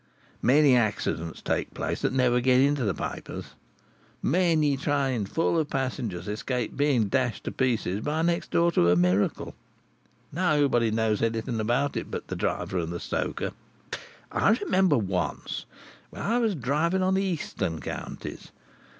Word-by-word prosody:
"Many 140 +1 +5
accidents 105 -7 -1
take - - -2
place - - -2
that - - +1
never 125 -2 +3
get 130 0 +4
into 140 0 +3
the 100 - +1
papers; - - -6 0.7
many 160 -2 +3
trains, 135 -7 0
full 165 0 +1
of 155 -2 -1
passengers, 120 -9 -3
escape 115 +3 -2
being 140 -7 +2
dashed 125 -2 0
to - - -3
pieces 115 -7 0
by 155 +4 -1
next 170 0 0
door 170 0 +3
to 85 - +3
a 90 - +5
miracle. 90 +3 +1 0.8
Nobody 145 -8 +2
knows 110 -1 +1
anything 115 +1 -1
about 120 +6 +1
it - - -3
but - - -6
the - - -3
driver 95 - -1
and 85 -1 -3
the 85 - -4
stoker. - - -2 0.8
I 210 - +3
remember 185 -6 +3
once, 95 -6 -2 0.4
when - - -7
I 230 +4 +1
was 225 -5 +1
driving 155 +8 +1
on 185 +1 +2
the 190 +1 +2
Eastern 155 - -2
Counties. 70 - -7
130 Hz, 150 wpm, -27 LUFS, 110-155 Hz, 0.8 s, Many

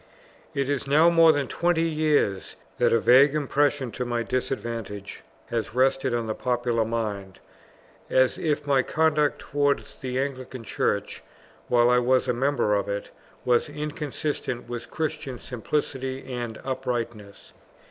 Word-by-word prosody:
It 140 -1 0
is 140 -1 -1
now 155 +5 +5
more 165 -1 +7
than 145 -3 -1
twenty 170 +2 +1
years 150 -11 0 0.2
that - - +4
a - - +5
vague 130 +6 +6
impression 145 -3 +1
to 125 - -3
my 120 -1 -1
disadvantage 115 -6 -4 0.3
has 115 -1 -2
rested 130 0 +2
on 120 -1 -1
the 110 - -2
popular 120 -1 0
mind, 105 -4 -3 0.7
as 130 -1 +3
if 150 -2 -1
my 140 -2 +3
conduct 150 +1 +1
towards 145 -1 -1
the 130 -1 -3
Anglican 130 -2 -4
Church, 100 -2 -2 0.5
while 120 0 +4
I 125 - +5
was 130 +1 +2
a 125 - +2
member 130 -3 +1
of 100 0 0
it, 100 0 -4 0.3
was 125 +3 +2
inconsistent 150 -4 -4
with 120 -1 -6
Christian 155 -5 -3
simplicity 130 +1 -3
and 120 -2 -4
uprightness. 120 -6 -4
130 Hz, 140 wpm, -25 LUFS, 120-145 Hz, 0.7 s, more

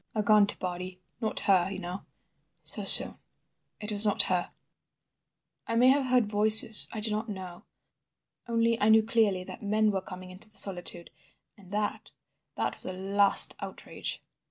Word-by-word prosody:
A 215 - -2
gaunt 210 -1 +2
body. 180 0 -8 0.2
Not 220 -2 -3
her, 190 -2 0
you 195 - -7
know. 180 +1 -9 0.6
So - - 0
soon—it 210 0 -1
was 205 0 -1
not 205 -2 +2
her.... 180 -1 -3 1.2
"I 230 - -4
may 245 +2 +3
have 270 0 0
heard 250 -2 +1
voices. 215 +1 +6
I 220 - -8
do 215 0 -2
not 215 +2 -5
know. 185 -3 -11 0.8
Only 230 0 -2
I 210 - +1
knew 220 0 +3
clearly 215 -5 -1
that 185 0 -13
men 215 +1 -1
were 190 -1 -4
coming 185 0 -12
into 205 +4 -5
the 215 - -4
solitude 175 -3 +1 0.4
and 195 -4 -20
that 210 0 -5 0.5
that - - -5
was - - -13
a 185 - -6
last 195 +2 +4
outrage. - - -6
205 Hz, 160 wpm, -26 LUFS, 185-220 Hz, 1.2 s, voices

